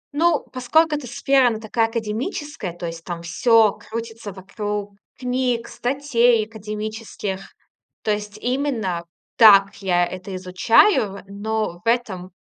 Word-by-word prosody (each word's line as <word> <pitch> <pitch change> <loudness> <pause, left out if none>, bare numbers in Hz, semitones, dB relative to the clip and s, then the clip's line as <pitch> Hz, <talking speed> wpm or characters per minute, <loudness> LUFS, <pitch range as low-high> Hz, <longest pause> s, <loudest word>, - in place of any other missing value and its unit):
Ну, 335 +3 +2
поскольку 300 +6 +2
эта 290 -4 -5
сфера, 275 0 +3
она 225 -2 -1
такая 225 +1 0
академическая, 225 - -4
то 175 - -5
есть 165 0 -6
там 170 -1 -6
всё 220 +5 +4
крутится 225 -2 -7
вокруг 205 +1 -5 0.2
книг, 250 -2 -1
статей 245 -4 +1
академических. 215 -2 -5 0.6
То 215 - +1
есть 210 0 -4
именно 240 -9 -1 0.3
так 200 -3 +7
я 175 -2 +2
это 185 +2 -7
изучаю, 195 - +3
но 205 -2 -3
в - - -10
этом 205 -7 0
220 Hz, 125 wpm, -22 LUFS, 195-245 Hz, 0.6 s, так